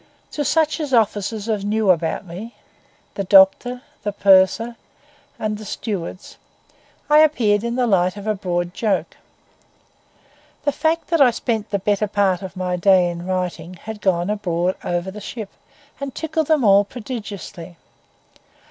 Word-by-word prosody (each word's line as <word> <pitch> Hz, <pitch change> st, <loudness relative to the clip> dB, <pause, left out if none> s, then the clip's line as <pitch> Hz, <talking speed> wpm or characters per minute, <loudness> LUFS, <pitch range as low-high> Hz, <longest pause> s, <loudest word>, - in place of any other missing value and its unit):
To 295 Hz, -, -2 dB
such 310 Hz, +3 st, +1 dB
of 300 Hz, -2 st, -3 dB
the 255 Hz, -, +4 dB
officers 215 Hz, 0 st, -1 dB
as 215 Hz, -3 st, -1 dB
knew 210 Hz, -1 st, +2 dB
about 165 Hz, +2 st, -1 dB
me—the 200 Hz, +1 st, -10 dB
doctor, 195 Hz, +7 st, +4 dB, 0.2 s
the 205 Hz, 0 st, -2 dB
purser, 200 Hz, +4 st, +4 dB, 0.6 s
and 215 Hz, -1 st, -3 dB
the -, -, -8 dB
stewards—I 205 Hz, -, -4 dB
appeared 230 Hz, -9 st, +3 dB
in 235 Hz, 0 st, -2 dB
the 250 Hz, -1 st, +1 dB
light 185 Hz, -3 st, +2 dB
of 205 Hz, -, -8 dB
a 215 Hz, -, +1 dB
broad 175 Hz, -3 st, -2 dB
joke. 215 Hz, -2 st, -1 dB, 1.5 s
The 290 Hz, -, +2 dB
fact 320 Hz, +3 st, -1 dB
that 335 Hz, -3 st, +2 dB
I 265 Hz, -, +8 dB
spent 225 Hz, -2 st, -2 dB
the 200 Hz, -, 0 dB
better 205 Hz, +2 st, 0 dB
part 195 Hz, -3 st, +1 dB
of 190 Hz, 0 st, -8 dB
my 180 Hz, -1 st, -1 dB
day 180 Hz, -1 st, +4 dB
in 170 Hz, +1 st, -7 dB
writing 185 Hz, -1 st, -3 dB
had 210 Hz, +3 st, -9 dB
gone 180 Hz, 0 st, +1 dB
abroad 180 Hz, -3 st, -1 dB
over 175 Hz, +2 st, -2 dB
the 210 Hz, +2 st, -9 dB
ship 215 Hz, 0 st, -7 dB, 0.5 s
and 280 Hz, -2 st, -6 dB
tickled 315 Hz, -1 st, -2 dB
them 310 Hz, -4 st, +3 dB
all 200 Hz, -1 st, +6 dB
prodigiously. 205 Hz, -7 st, -8 dB
205 Hz, 150 wpm, -21 LUFS, 185-235 Hz, 1.5 s, I